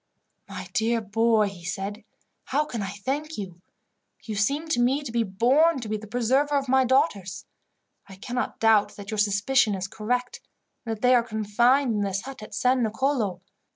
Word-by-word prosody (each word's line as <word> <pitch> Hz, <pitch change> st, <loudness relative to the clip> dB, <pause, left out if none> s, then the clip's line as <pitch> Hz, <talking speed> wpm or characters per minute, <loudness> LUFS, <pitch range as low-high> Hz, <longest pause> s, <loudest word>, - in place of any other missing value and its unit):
"My -, -, -7 dB
dear 230 Hz, +1 st, +1 dB
boy," 220 Hz, 0 st, +2 dB
he 180 Hz, -3 st, -12 dB
said, 195 Hz, +4 st, -5 dB, 0.4 s
"How 295 Hz, +3 st, 0 dB
can 235 Hz, -6 st, -5 dB
I 195 Hz, -, -3 dB
thank 275 Hz, +10 st, -4 dB
you! 180 Hz, -4 st, -7 dB, 0.6 s
You 220 Hz, -, -5 dB
seem 280 Hz, +10 st, 0 dB
to 280 Hz, -, +1 dB
me 265 Hz, +4 st, +2 dB
to 240 Hz, -, -6 dB
be 235 Hz, 0 st, +1 dB
born 255 Hz, -, +3 dB
to 235 Hz, -, -6 dB
be 215 Hz, -, -2 dB
the 215 Hz, 0 st, -7 dB
preserver 260 Hz, +6 st, +1 dB
of 275 Hz, -1 st, -2 dB
my 265 Hz, +1 st, +4 dB
daughters. 255 Hz, -, 0 dB, 0.6 s
I 195 Hz, -, -10 dB
cannot 245 Hz, +5 st, -4 dB
doubt 220 Hz, -2 st, +3 dB
that 205 Hz, +2 st, -9 dB
your 215 Hz, -, -2 dB
suspicion 210 Hz, +3 st, +2 dB
is 190 Hz, 0 st, -4 dB
correct, 245 Hz, +5 st, -3 dB, 0.5 s
and 225 Hz, -, -1 dB
that 210 Hz, -, -20 dB
they 250 Hz, +1 st, +5 dB
are 245 Hz, -, +5 dB
confined 235 Hz, +4 st, +2 dB
in 210 Hz, -, -1 dB
this 195 Hz, -1 st, -1 dB
hut 265 Hz, -2 st, -9 dB
at 215 Hz, -, -9 dB
San 255 Hz, 0 st, +2 dB
Nicolo. 220 Hz, -4 st, -1 dB
225 Hz, 190 wpm, -25 LUFS, 205-260 Hz, 0.6 s, they